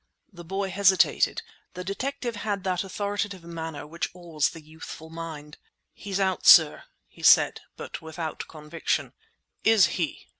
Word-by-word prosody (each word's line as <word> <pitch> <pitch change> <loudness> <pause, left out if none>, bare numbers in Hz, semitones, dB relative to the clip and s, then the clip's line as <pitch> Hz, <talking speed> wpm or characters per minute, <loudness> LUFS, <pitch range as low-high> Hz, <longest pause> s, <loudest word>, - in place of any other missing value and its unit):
The 175 -1 -10
boy 195 +3 -3
hesitated. 190 -1 +3 0.3
The 180 - -5
detective 240 +4 -4
had 205 -2 -3
that 185 -1 -1
authoritative 200 -1 -3
manner 165 -3 -6
which 165 +3 -4
awes 165 -4 -1
the 165 - -11
youthful 160 +1 -10
mind. 160 -3 -8 0.3
"He's 200 -1 -4
out, 190 -2 0
sir," 160 -3 +7 0.2
he - - -17
said, - - +5 0.2
but - - -7
without 160 0 -6
conviction. 155 +1 -3 0.5
"Is 220 -4 +6
he?" 165 -5 -3
175 Hz, 140 wpm, -26 LUFS, 160-195 Hz, 0.5 s, sir